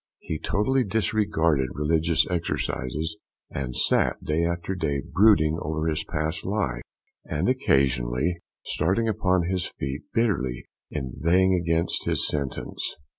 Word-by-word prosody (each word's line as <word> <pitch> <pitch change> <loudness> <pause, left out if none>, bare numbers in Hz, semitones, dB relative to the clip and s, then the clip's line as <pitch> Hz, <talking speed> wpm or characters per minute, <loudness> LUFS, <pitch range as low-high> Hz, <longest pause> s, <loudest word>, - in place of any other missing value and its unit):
He 80 - -5
totally 130 +6 +1
disregarded 95 - +1
religious 80 +3 +2
exercises, 80 -2 -2 0.3
and 65 -3 -4
sat - - +2
day 80 +2 0
after 85 +2 -1
day 70 -6 -1
brooding 85 -6 +5
over 80 +1 -2
his 80 -1 0
past 80 +2 -2
life, 95 - -1 0.4
and 75 -1 -1
occasionally 70 - +1 0.3
starting 95 +9 +1
upon 95 -4 +2
his 90 0 -1
feet, 70 +1 -5
bitterly 80 - 0 0.2
inveighing 85 +7 +1
against 85 -1 0
his - - +2
sentence. 70 -3 -3
80 Hz, 120 wpm, -26 LUFS, 75-95 Hz, 0.4 s, brooding